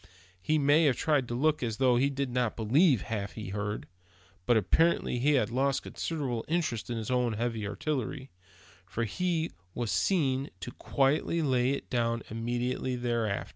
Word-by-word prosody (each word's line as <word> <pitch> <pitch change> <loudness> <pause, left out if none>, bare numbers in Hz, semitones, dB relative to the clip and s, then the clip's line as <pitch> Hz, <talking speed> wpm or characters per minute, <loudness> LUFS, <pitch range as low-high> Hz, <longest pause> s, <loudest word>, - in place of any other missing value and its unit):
He 155 +11 +1
may 145 +3 +4
have 135 -4 +4
tried 145 -5 +1
to 120 - -3
look 150 +4 +2
as 115 -3 -2
though 130 -1 +4
he 135 +3 +3
did 140 -2 -3
not 125 -2 0
believe 130 - +3
half 105 -3 -4
he 110 -4 -6
heard; 105 -2 -3 0.6
but 120 - +5
apparently 125 - +2
he 145 +4 +3
had 130 -4 +2
lost 135 +2 +1
considerable 135 -8 -3
interest 155 -10 -1
in 120 - -2
his 110 +1 -4
own 125 -2 +1
heavy 115 -1 -2
artillery, 135 +3 -3 0.6
for 115 +5 -2
he 165 - -1 0.2
was 120 -3 -2
seen 140 -7 +1
to 120 - -5
quietly 145 +6 +1
lay 130 -3 +2
it 140 - -2
down 115 -2 0
immediately 120 +3 -2
afterwards. 115 -4 -1
125 Hz, 170 wpm, -29 LUFS, 115-140 Hz, 0.6 s, but